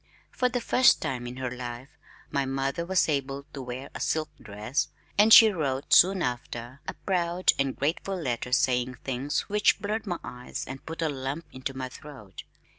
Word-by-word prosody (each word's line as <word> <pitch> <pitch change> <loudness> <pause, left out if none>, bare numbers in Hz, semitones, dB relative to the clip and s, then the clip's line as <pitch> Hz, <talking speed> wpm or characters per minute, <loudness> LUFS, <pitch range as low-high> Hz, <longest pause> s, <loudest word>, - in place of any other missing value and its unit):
For 250 - +1
the 245 0 -2
first 255 +2 +5
time 120 -2 -3
in 125 +1 -7
her 130 -1 -3
life, 125 +1 -7 0.4
my 140 -1 +1
mother 135 +4 -2
was 190 -1 +3
able 140 -2 -2
to 135 - -6
wear 125 +2 -7
a - - -6
silk 155 -1 -1
dress, 110 +6 -2 0.3
and 210 +2 +5
she 220 0 +11
wrote, 140 -7 -1
soon 190 +1 +6
after, 120 +1 -4
a - - -4
proud 180 -1 +2
and 135 -1 0
grateful 170 +7 -1
letter 125 -5 -3
saying 125 -2 +2
things 135 +3 -1
which 210 0 +2
blurred 215 +1 -3
my 175 -2 -1
eyes 125 0 -6
and 135 +1 -8
put 165 +1 -4
a - - +2
lump 140 +3 -4
into 130 +1 -5
my 130 -1 -3
throat. 125 - -11
135 Hz, 185 wpm, -27 LUFS, 125-170 Hz, 0.4 s, she